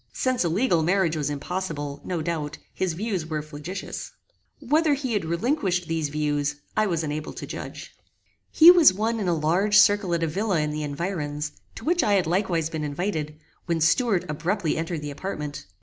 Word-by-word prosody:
Since 255 -4 0
a 170 - +1
legal 175 -1 +2
marriage 170 0 +2
was 150 -2 -1
impossible, 145 -1 -4
no 175 -4 -3
doubt, 155 -3 -3 0.2
his 185 -3 -1
views 190 -3 -3
were 155 -2 -3
flagitious. 155 +5 -7 0.5
Whether 295 +2 +2
he 260 -4 -3
had 205 -5 0
relinquished 180 - 0
these 160 -2 -1
views 145 -1 -1 0.2
I 215 0 +2
was 165 -4 -1
unable 150 0 -4
to - - -7
judge. - - -8 0.5
He 330 +2 +9
was 340 - +7
one 225 +3 0
in 200 - -2
a 175 - +2
large 180 +7 +2
circle 205 -3 +5
at 165 - -1
a - - +1
villa 190 +2 0
in 150 0 0
the 150 0 -3
environs, 150 -1 -3 0.2
to 225 - -9
which 345 +1 +3
I 205 - +2
had 195 -3 +3
likewise 170 -2 0
been 160 -1 -4
invited, 150 0 -3 0.3
when 170 -1 0
Stuart 180 +3 +2
abruptly 165 +3 -1
entered 165 -1 -3
the 145 - -4
apartment. 150 - -5
170 Hz, 185 wpm, -25 LUFS, 150-205 Hz, 0.5 s, He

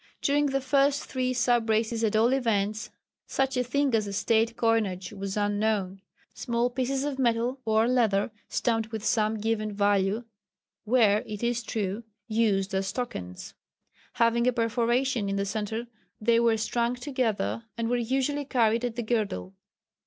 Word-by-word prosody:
During 290 +1 +3
the 275 0 0
first 275 +2 +2
three 255 -1 -1
sub 240 -2 +1
races 225 +1 +1
at 220 -1 +1
all 230 +4 +4
events, 215 -4 0 0.4
such 270 0 0
a 250 - +1
thing 275 +2 0
as 215 -2 +2
a 200 - -5
State 225 +3 +1
coinage 215 -5 0
was 195 0 -4
unknown. 205 -2 0 0.3
Small 240 +1 -1
pieces 265 +2 -1
of 285 -2 -3
metal 240 +1 +1
or 220 +1 +3
leather 225 -4 +2 0.2
stamped 225 -2 0
with 220 -1 -5
some 215 0 +1
given 215 0 -1
value 200 +1 +1 0.6
were, 215 -3 +4
it 210 +1 -6
is 240 0 0
true, 210 -1 -3 0.2
used 205 -4 +1
as 195 0 -1
tokens. 90 - -6 0.6
Having 235 +1 +2
a 250 - +3
perforation 235 0 +1
in 195 - -1
the 200 0 0
centre 215 +3 -3 0.3
they 230 +1 +3
were 230 -1 +3
strung 235 +2 0
together, 245 -4 -2
and 230 0 -1
were 245 - +1
usually 265 +4 0
carried 235 -4 +1
at 240 -2 -2
the 240 - -2
girdle. 205 - -2
230 Hz, 160 wpm, -27 LUFS, 210-245 Hz, 0.6 s, all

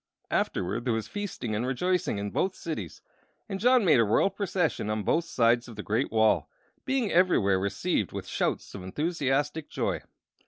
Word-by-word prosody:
Afterward 90 +6 -1
there 120 -3 +1
was 110 - -3
feasting 195 - -4
and 105 +3 -1
rejoicing 160 - 0
in 100 0 -3
both 190 0 0
cities, 130 - -6 0.4
and 195 - -4
John 245 0 +4
made 155 -8 +5
a - - +6
royal 110 - +3
procession 185 - -1
on 105 0 -1
both 170 +9 +1
sides 120 -5 +2
of 120 - -10
the 105 - -6
great 110 +2 0
wall, 110 -1 +3 0.4
being 260 -6 0
everywhere 140 - +3
received 100 +1 -1
with - - -5
shouts - - -2
of 100 - -7
enthusiastic 145 - -1
joy. - - -1
135 Hz, 170 wpm, -28 LUFS, 110-180 Hz, 0.4 s, a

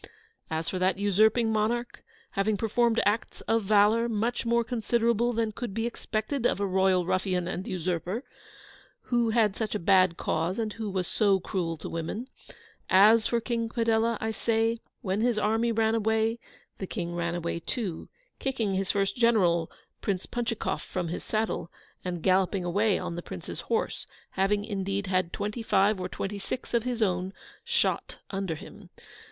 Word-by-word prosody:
As 160 +1 -2
for 185 - -2
that 185 +1 +2
usurping 215 +3 +3
monarch, 235 +3 -1 0.3
having 205 +1 +1
performed 230 +2 +2
acts 210 +3 0
of 225 -2 0
velour 215 +3 +4
much 230 +2 -1
more 235 0 +3
considerable 235 0 +1
than 225 -2 0
could 215 -2 -5
be 225 0 0
expected 235 +2 -1
of - - -1
a 200 - +1
royal 190 -1 +2
ruffian 185 -1 0
and 185 +1 -4
usurper, 180 - -2 0.9
who 240 -1 +3
had 220 -3 +3
such 220 -1 -2
a - - 0
bad 185 -1 +4
cause, 165 +4 -1
and 220 -2 -2
who 220 -2 -4
was 185 -2 -1
so 200 -1 +2
cruel 175 -3 -2
to - - -7
women, 170 +9 -4 0.6
as 215 +3 +6
for 235 - +1
King 230 -1 -2
Padella, 230 -1 +1
I 220 - -1
say, 225 +1 +1 0.2
when 195 +2 -1
his 240 -1 +2
army 225 +2 +2
ran 225 0 +2
away, 220 +1 +1 0.4
the 190 - -4
King 175 -4 -4
ran 170 0 -1
away 170 -1 -2
too, 180 -1 -4 0.3
kicking 235 -7 -1
his 190 0 -1
first 195 -1 +1
general, 185 -9 +3 0.3
Prince 190 -3 -1
Punchikoff, 235 -2 -2
from 175 -3 -3
his 175 - -4
saddle, 215 -5 -1 0.3
and 175 -3 -4
galloping 185 0 +2
away 200 +3 +2
on 180 -2 -4
the 175 - -4
Prince's - - -7
horse, 455 +1 -2 0.2
having, 205 +2 +1
indeed, 195 -1 -2
had 185 -2 0
twenty 210 +3 -3
five 200 -2 +3
or 180 0 -3
twenty 200 +2 -4
six 245 +6 -5
of 235 0 +2
his 245 -3 0
own 185 -1 -1 0.3
shot - - 0 0.2
under 195 -4 -2
him. 195 +2 -12
210 Hz, 170 wpm, -28 LUFS, 185-230 Hz, 0.9 s, as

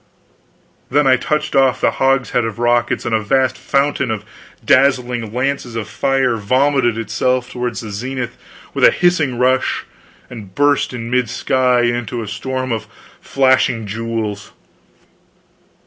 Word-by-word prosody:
Then 145 +2 +2
I 130 -1 +5
touched 150 +4 -2
off 135 -2 +3
the - - +2
hogshead 135 -2 +1
of 115 -1 -4
rockets, 120 0 +1
and 115 - -2
a 110 - +3
vast 130 +4 +1
fountain 140 -1 0
of 110 -2 -3 0.4
dazzling 125 -4 +2
lances 125 -1 -2
of 115 -2 -4
fire 135 -3 0
vomited 130 +2 +1
itself 125 +3 -1
toward 125 -1 -3
the 110 -3 -6
zenith 125 +4 -4 0.4
with - - -2
a - - +9
hissing 165 -8 +1
rush, 130 +1 +1 0.4
and 105 -6 -11
burst 145 0 +2
in 120 -1 -6
mid 125 -2 +1
sky 125 0 +1
into 120 0 -1
a - - -8
storm 130 +5 -4
of 110 -1 -3 0.3
flashing 130 -4 +2
jewels! 110 -1 -4
125 Hz, 140 wpm, -17 LUFS, 115-130 Hz, 0.4 s, a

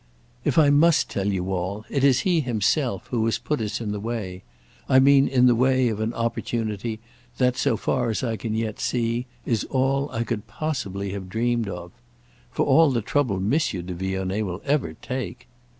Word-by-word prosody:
"If - - 0
I 150 -3 +6
must 160 +3 +4
tell 100 0 -1
you 95 0 -2
all, 95 +4 -3
it 140 - -1
is 135 -3 +5
he 180 -3 +2
himself 120 - 0
who 115 -3 +1
has 115 - +1
put 150 -5 -2
us 105 -2 -2
in 110 -3 -3
the 105 - -3
way. 100 -5 -4 0.5
I 130 - +6
mean 135 +1 +6
in 125 -2 +3
the 125 - +6
way 130 +1 +3
of 110 -2 -3
an 110 +1 -1
opportunity 115 -1 -2 0.4
that, 125 -1 +2
so 115 - +1
far 120 +2 0
as 110 - -2
I 115 -3 -1
can 110 0 -3
yet 110 -1 -2
see, 120 +1 -1 0.2
is 115 -3 0
all 135 +1 0
I 115 - -1
could 115 -3 -4
possibly 100 -11 -3
have 95 -2 -6
dreamed 115 +1 0
of. 90 -1 -7 0.6
For - - 0
all 160 -1 +5
the 120 -5 0
trouble 120 -6 0
Monsieur 100 - 0
de 90 +1 -5
Vionnet 95 +3 -2
will 95 -1 -5
ever 145 0 0
take!" 125 -8 -5
115 Hz, 195 wpm, -24 LUFS, 100-130 Hz, 0.6 s, I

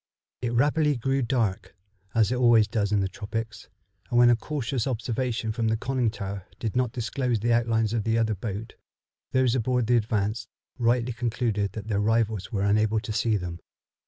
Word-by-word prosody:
It 120 -1 -2
rapidly 145 +3 +2
grew 135 +3 0
dark, 110 -7 -1 0.4
as 115 0 +3
it - - +1
always 120 -3 +5
does 105 -2 -1
in 105 -1 +3
the 95 - 0
tropics, 110 +3 -6 0.4
and 120 - +1
when 120 0 +7
a - - +5
cautious 130 -1 -3
observation 120 -2 -2
from 115 0 -1
the 110 0 +1
conning 125 0 0
tower 100 -3 -6
did 110 -1 -3
not 125 -2 +1
disclose 125 0 -1
the 120 +1 +2
outlines 115 -2 +1
of 115 -3 0
the 115 +1 +1
other 110 -1 +1
boat, 105 +2 -5 0.6
those 130 -2 +3
aboard 125 -1 +1
the 120 +2 +4
Advance 105 -1 -1 0.3
rightly 120 +1 +2
concluded 110 -5 -1
that 110 -1 -7
their 105 -2 0
rivals 110 -2 0
were 100 -2 -1
unable 110 +2 +2
to 110 0 -5
see 110 -1 +1
them. 90 -2 -5
115 Hz, 185 wpm, -26 LUFS, 105-120 Hz, 0.6 s, when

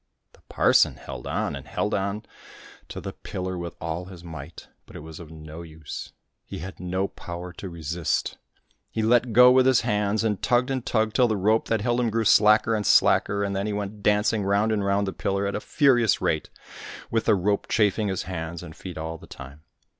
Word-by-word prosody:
The - - -23
parson - - +4
held - - -8
on - - -2
and - - -9
held 105 - -2
on 100 +2 -2 0.7
to - - -6
the - - -6
pillar 95 0 -5
with 85 -1 -6
all 85 +2 -4
his 90 -2 -12
might, 80 -2 -9 0.2
but - - -15
it - - -7
was 80 0 -10
of 85 -3 -10
no 80 0 -10
use. 80 -2 -8 0.3
He - - -8
had 95 +4 -8
no 95 +2 -1
power 90 0 -8
to 95 - -7
resist; 85 0 -2 0.5
he 110 - -2
let 120 +2 +3
go 125 +3 +8
with 130 0 +5
his 130 -2 +4
hands, 105 +1 0
and 105 -3 -1
tugged 125 +2 +2
and 130 -2 -2
tugged 110 -3 0
till 125 -2 +5
the 110 -2 0
rope 110 +4 +2
that 115 -2 0
held 120 +2 +1
him 120 -2 +1
grew 115 +1 -1
slacker 110 +1 +5
and 105 -2 -1
slacker, 100 0 +4
and 100 -1 -2
then 100 +2 -1
he 105 - -2
went 105 0 -5
dancing 105 +1 +2
round 100 +3 +2
and 105 -2 0
round 100 +1 +1
the 95 - -4
pillar 100 0 -1
at 100 - -2
a - - -2
furious 120 - +3
rate, - - -1 0.6
with 115 -1 0
the 110 - +4
rope 100 +2 0
chafing 105 -1 +2
his 95 -2 -2
hands 85 -2 -5
and 80 - -10
feet 90 -2 -9
all 80 +1 -5
the - - -14
time. 70 +3 -11
100 Hz, 215 wpm, -25 LUFS, 85-110 Hz, 0.7 s, go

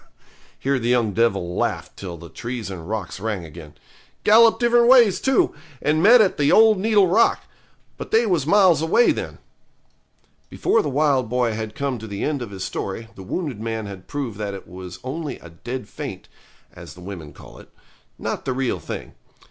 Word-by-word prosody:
here 135 0 0
the 120 0 -2
young 120 -4 +2
devil 95 -5 0
laughed - - -2
till 90 -3 -7
the 85 +1 -11
trees 115 +1 -6
and 85 -1 -8
rocks 100 -5 -4
rang 105 -4 -3
again. 75 -2 -12 0.5
'Gallop 225 +2 +6
different 240 0 +4
ways, 235 -7 +6
too, 265 -2 +2 0.3
and 155 +4 +1
met 230 +5 +7
at 195 - +2
the 145 0 +3
old 220 -2 +6
needle 210 -1 +4
rock. 190 +6 +3 0.6
But - - -7
they 225 +2 +3
was 170 -9 0
miles 185 -5 +5
away 165 +9 +4
then.' - - -5 1.1
Before 225 - +1
the 145 - -3
wild 135 -4 +1
boy 125 -2 0
had 110 0 -5
come 140 -3 -2
to 110 - -8
the 100 -1 -5
end 145 -3 -1
of 120 - -5
his 95 -2 -7
story 110 +4 -5
the - - -12
wounded 125 - -4
man 110 -1 -3
had 95 -2 -9
proved 130 -8 -5
that 100 -2 -3
it 95 - -10
was 90 +1 -9
only 140 +1 -5
a 85 - -14
dead 120 +7 -7
faint, - - -8 0.5
as - - -11
the 90 - -13
women 90 -5 -8
call - - -14
it, - - -16 0.5
not - - -4
the 130 - -1
real 130 -1 -1
thing. - - -7
125 Hz, 190 wpm, -22 LUFS, -, 1.1 s, met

